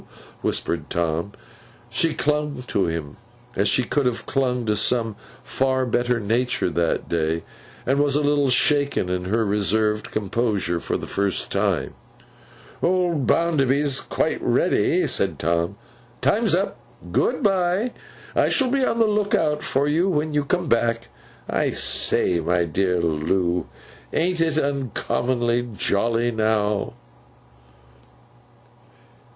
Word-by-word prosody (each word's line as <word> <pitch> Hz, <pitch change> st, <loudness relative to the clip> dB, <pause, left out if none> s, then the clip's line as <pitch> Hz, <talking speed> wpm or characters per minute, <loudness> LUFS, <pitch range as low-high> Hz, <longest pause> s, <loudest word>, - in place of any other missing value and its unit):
whispered 80 Hz, -3 st, -1 dB
Tom. 85 Hz, +3 st, -1 dB, 0.6 s
She 160 Hz, +7 st, +1 dB
clung 150 Hz, -3 st, -1 dB
to 100 Hz, -6 st, 0 dB
him 80 Hz, -2 st, -4 dB, 0.4 s
as 100 Hz, +2 st, +2 dB
she 130 Hz, -, +3 dB
should 140 Hz, +2 st, 0 dB
have 120 Hz, -2 st, -2 dB
clung 125 Hz, -3 st, 0 dB
to 105 Hz, -1 st, +1 dB
some 115 Hz, +1 st, +1 dB, 0.3 s
far 130 Hz, -1 st, 0 dB
better 120 Hz, 0 st, 0 dB
nature 115 Hz, -2 st, 0 dB
that 85 Hz, -1 st, 0 dB
day, 80 Hz, 0 st, -1 dB, 0.4 s
and 135 Hz, +2 st, +1 dB
was 145 Hz, -1 st, +2 dB
a 150 Hz, -, +2 dB
little 145 Hz, -1 st, +2 dB
shaken 140 Hz, -5 st, +2 dB
in 90 Hz, 0 st, -2 dB
her 110 Hz, +4 st, +1 dB
reserved 105 Hz, +1 st, +1 dB
composure 105 Hz, -4 st, -1 dB
for -, -, -2 dB
the -, -, -7 dB
first 100 Hz, -1 st, -1 dB
time. -, -, 0 dB, 0.9 s
'Old 175 Hz, -7 st, +1 dB
Bounderby's 140 Hz, -4 st, +2 dB
quite -, -, -1 dB
ready,' -, -, +2 dB
said 95 Hz, -6 st, 0 dB
Tom. 85 Hz, +2 st, 0 dB, 0.4 s
'Time's -, -, +2 dB
up. -, -, -2 dB, 0.3 s
Good 245 Hz, -, +1 dB
bye! 195 Hz, +3 st, +1 dB, 0.4 s
I -, -, +3 dB
shall 260 Hz, -3 st, +2 dB
be 275 Hz, -1 st, +1 dB
on 230 Hz, -, +1 dB
the 230 Hz, -, +4 dB
look 210 Hz, 0 st, +1 dB
out 150 Hz, -6 st, 0 dB
for 140 Hz, +2 st, 0 dB
you, 165 Hz, +6 st, +2 dB
when 155 Hz, -3 st, 0 dB
you 145 Hz, -1 st, +1 dB
come 175 Hz, +3 st, -1 dB
back. 115 Hz, -, 0 dB, 0.4 s
I -, -, 0 dB
say, 85 Hz, -, +2 dB
my 85 Hz, +2 st, +1 dB
dear 90 Hz, +2 st, 0 dB
Loo! 85 Hz, +2 st, 0 dB, 0.4 s
AN'T 175 Hz, +1 st, 0 dB
it 160 Hz, -2 st, +1 dB
uncommonly 125 Hz, -3 st, -1 dB
jolly 115 Hz, +3 st, +1 dB
now! 110 Hz, -2 st, 0 dB
120 Hz, 130 wpm, -23 LUFS, 95-150 Hz, 0.9 s, the